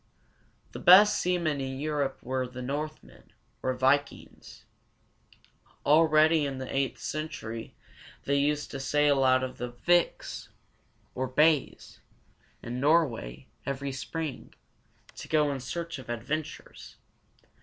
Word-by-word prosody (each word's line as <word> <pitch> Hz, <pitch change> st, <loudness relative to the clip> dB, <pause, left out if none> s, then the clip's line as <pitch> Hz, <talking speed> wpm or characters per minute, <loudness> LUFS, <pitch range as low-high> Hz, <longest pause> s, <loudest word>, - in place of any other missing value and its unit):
The -, -, -8 dB
best 200 Hz, +4 st, +7 dB
seamen 170 Hz, -5 st, 0 dB
in 130 Hz, 0 st, -4 dB
Europe 145 Hz, -2 st, -2 dB
were 130 Hz, 0 st, -2 dB
the 125 Hz, 0 st, -8 dB
Northmen, 150 Hz, +4 st, -6 dB, 0.3 s
or 130 Hz, -1 st, -1 dB
vik´ings. 135 Hz, +3 st, -1 dB, 1.2 s
Already 155 Hz, +1 st, +5 dB
in 140 Hz, -2 st, -3 dB
the 130 Hz, 0 st, -6 dB
eighth 135 Hz, -1 st, 0 dB
century 115 Hz, -7 st, -6 dB, 0.5 s
they 140 Hz, -, -1 dB
used 145 Hz, +1 st, 0 dB
to 135 Hz, -, -5 dB
sail 145 Hz, 0 st, +2 dB
out 130 Hz, 0 st, +4 dB
of 130 Hz, 0 st, -6 dB
the 125 Hz, 0 st, -4 dB
viks, 175 Hz, +8 st, 0 dB, 0.7 s
or 130 Hz, +1 st, -2 dB
bays, 150 Hz, +3 st, +1 dB, 0.6 s
in 120 Hz, +2 st, -5 dB
Nor´way, 125 Hz, -, +1 dB, 0.2 s
every 140 Hz, 0 st, -3 dB
spring, 150 Hz, +2 st, -6 dB, 0.6 s
to -, -, -8 dB
go 150 Hz, -2 st, +2 dB
in 135 Hz, -, -4 dB
search 165 Hz, +4 st, -5 dB
of 130 Hz, -, -12 dB
adventures. 130 Hz, +7 st, -5 dB
140 Hz, 120 wpm, -28 LUFS, 130-155 Hz, 1.2 s, best